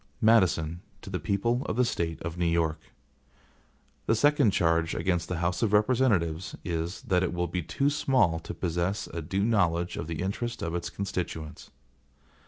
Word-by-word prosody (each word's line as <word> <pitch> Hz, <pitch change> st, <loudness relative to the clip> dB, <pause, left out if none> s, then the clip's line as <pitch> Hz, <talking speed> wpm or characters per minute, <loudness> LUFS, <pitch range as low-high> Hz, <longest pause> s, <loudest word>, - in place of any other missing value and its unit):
MADISON 90 Hz, -7 st, +3 dB, 0.2 s
To 95 Hz, -, -8 dB
the 90 Hz, -, -2 dB
People 115 Hz, +5 st, 0 dB
of -, -, -1 dB
the 125 Hz, +1 st, +3 dB
State 85 Hz, -7 st, -2 dB
of 85 Hz, 0 st, -4 dB
New 90 Hz, -1 st, 0 dB
York: 85 Hz, -2 st, +1 dB, 1.3 s
THE 115 Hz, -, +4 dB
SECOND 145 Hz, -3 st, +4 dB
charge 85 Hz, -2 st, +1 dB
against 90 Hz, -2 st, 0 dB
the 90 Hz, -, -2 dB
House 85 Hz, +2 st, -1 dB
of 110 Hz, -3 st, +1 dB
Representatives 105 Hz, -7 st, +2 dB
is, 85 Hz, +2 st, -3 dB
that 90 Hz, -2 st, +2 dB
it 95 Hz, -, 0 dB
will 90 Hz, 0 st, 0 dB
be 90 Hz, +1 st, -2 dB
too 140 Hz, -, 0 dB
small 130 Hz, -, +2 dB
to -, -, -7 dB
possess 90 Hz, +3 st, -1 dB
a 85 Hz, -, -3 dB
due 95 Hz, +5 st, -1 dB
knowledge 90 Hz, -6 st, +1 dB
of 85 Hz, -, -4 dB
the 80 Hz, +1 st, -3 dB
interests 120 Hz, +5 st, -3 dB
of 85 Hz, -, -2 dB
its 85 Hz, 0 st, -3 dB
constituents. 90 Hz, -5 st, -5 dB
90 Hz, 175 wpm, -28 LUFS, 85-105 Hz, 1.3 s, THE